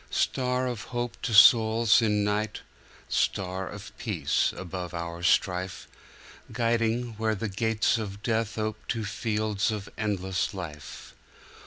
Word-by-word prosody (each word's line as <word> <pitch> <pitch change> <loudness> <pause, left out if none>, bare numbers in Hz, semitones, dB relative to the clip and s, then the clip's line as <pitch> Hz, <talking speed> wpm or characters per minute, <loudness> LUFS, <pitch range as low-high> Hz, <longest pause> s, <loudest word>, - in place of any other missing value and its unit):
Star 125 0 0
of 120 -5 -4
hope 120 -1 -4
to - - -2
souls 110 +1 +6
in 105 -2 +2
night, 105 +1 -1 0.5
Star 95 0 -1
of 100 0 -10
peace 85 - 0
above 90 -1 -6
our 85 0 -5
strife, 90 0 +1 0.6
Guiding, 115 0 0
where 110 -1 +1
the 110 +2 -3
gates 110 +3 +1
of 100 -1 -6
death 115 -2 -1
Ope 110 0 -2
to 115 -2 -2
fields 105 0 -1
of 105 -2 -4
endless 95 -2 -1
life. 75 -6 -8
105 Hz, 130 wpm, -27 LUFS, 95-115 Hz, 0.6 s, souls